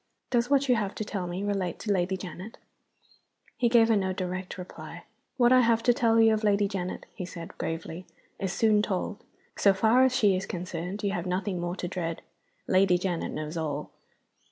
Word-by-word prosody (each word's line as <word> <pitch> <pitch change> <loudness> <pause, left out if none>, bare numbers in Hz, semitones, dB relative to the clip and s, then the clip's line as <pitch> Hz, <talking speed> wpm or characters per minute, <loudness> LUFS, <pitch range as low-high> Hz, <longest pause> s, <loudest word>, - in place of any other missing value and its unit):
"Does 240 -1 +2
what 280 -1 +3
you 250 - +5
have 205 -2 -2
to 215 - -4
tell 190 -3 -3
me 180 +3 -4
relate 195 -4 -1
to 210 - -1
Lady 190 0 +1
Janet?" 185 +3 -8 1.0
He 240 - +2
gave 230 -1 +5
her 225 - +5
no 190 -2 0
direct 185 0 -4
reply. 180 -1 -9 0.3
"What 245 -1 +5
I 255 - +7
have 230 -1 +2
to 245 - +5
tell 230 -1 +3
you 225 0 +6
of 215 0 -1
Lady 205 -1 +3
Janet," 185 -2 -4
he - - -6
said, 170 -2 -8
gravely, 165 +2 -5 0.3
"is 190 -2 -2
soon 210 +2 +3
told. 205 +1 -3 0.3
So 200 -1 +4
far 225 +6 +4
as 260 -1 +3
she 205 -5 +4
is 190 +1 -3
concerned 180 +3 -5
you 200 - +1
have 180 -2 -3
nothing 185 0 -1
more 175 +1 -2
to 180 - -4
dread. 170 -2 -4 0.4
Lady 185 -1 +4
Janet 175 -2 -2
knows 155 +2 -5
all." 150 -2 -3
195 Hz, 200 wpm, -28 LUFS, 180-220 Hz, 1.0 s, I